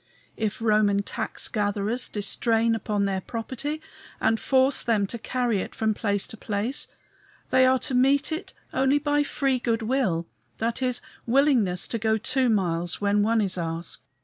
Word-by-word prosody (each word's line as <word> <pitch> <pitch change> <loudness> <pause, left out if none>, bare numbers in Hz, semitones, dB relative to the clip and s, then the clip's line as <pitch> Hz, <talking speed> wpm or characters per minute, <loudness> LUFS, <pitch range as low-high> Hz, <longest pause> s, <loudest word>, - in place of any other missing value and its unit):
If 220 0 -3
Roman 210 -2 +3
tax - - -1
gatherers 210 +3 -1
distrain 225 +2 +1
upon 210 -2 -1
their 190 -1 -1
property 260 +8 -5 0.4
and 225 0 +2
force 265 +1 +3
them 220 -4 +1
to 235 +4 -5
carry 245 -2 0
it - - -6
from 220 -1 +1
place 205 -2 -1
to 225 - -7
place, 215 +6 -2 0.6
they 260 0 +5
are 260 0 +4
to 265 +1 -2
meet 275 +4 +3
it 320 +5 -4 0.2
only 270 +2 +3
by 290 0 +1
free 275 -2 0
good 230 -2 -1
will, 220 -9 0 0.3
that 230 +3 -2
is, 250 -1 +1 0.3
willingness 235 -8 +2
to 230 - -2
go 220 0 +2
two 255 +3 +1
miles 175 -5 0
when 205 0 +2
one 225 +2 +2
is 185 -3 -1
asked. 165 0 -4
225 Hz, 165 wpm, -25 LUFS, 205-260 Hz, 0.6 s, they